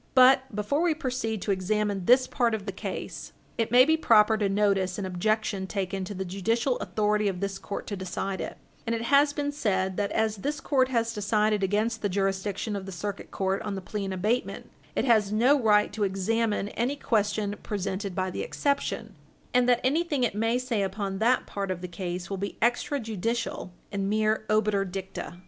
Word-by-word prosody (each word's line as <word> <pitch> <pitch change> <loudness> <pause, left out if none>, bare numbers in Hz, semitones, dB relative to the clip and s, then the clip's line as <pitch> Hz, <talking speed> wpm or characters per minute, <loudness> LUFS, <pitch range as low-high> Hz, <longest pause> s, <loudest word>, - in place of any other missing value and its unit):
But, 260 -1 +6
before 210 +9 0
we 340 -2 +2
proceed 250 - -2
to 205 - 0
examine 200 0 0
this 255 +4 +6
part 235 -4 +1
of 205 -2 -6
the 200 - -3
case, 190 - -6 0.3
it 225 - +1
may 250 +3 +7
be 315 +2 +4
proper 220 -7 +5
to 210 -2 0
notice 195 -2 +1
an 200 - -3
objection 195 +1 -1
taken 195 -1 -2
to 205 - -6
the 190 +1 -3
judicial 225 +7 0
authority 210 0 +1
of 190 -2 -2
this 195 0 -3
court 200 - -5
to 205 - -4
decide 190 0 -3
it, - - -5 0.3
and 230 - +1
it 230 - -3
has 285 +4 +4
been 290 0 -2
said 190 -9 -1
that, 205 -1 0
as 220 -1 0
this 290 +10 -3
court 265 -5 +2
has 230 -3 0
decided 210 0 +1
against 215 +4 0
the 205 - 0
jurisdiction 195 +2 -1
of 195 -1 -5
the - - -5
Circuit 200 +3 -5
Court 190 0 -1
on 210 -2 -3
the - - -3
plea 200 +2 -4
in 190 - -3
abatement, 210 +7 -2 0.2
it - - +1
has 215 -5 +3
no 255 +6 +4
right 210 -2 +3
to 210 0 -1
examine 205 +2 0
any 245 +6 -1
question 210 -5 0
presented 200 -1 -3
by 185 -1 -1
the - - -4
exception, 280 -1 -1 0.4
and 250 0 +4
that 245 -1 +4
anything 290 0 +1
it 240 - +1
may 225 +3 +1
say 250 -4 -1
upon 195 0 -2
that 245 +3 +3
part 200 -1 -4
of 185 -2 -2
the 180 - -4
case 175 0 -5
will 195 - -4
be 200 +2 -4
extrajudicial, 230 -3 -1 0.2
and 200 -1 -1
mere 215 +1 +1
obiter 215 -2 +2
dicta. 190 -2 -6
210 Hz, 200 wpm, -27 LUFS, 195-235 Hz, 0.4 s, may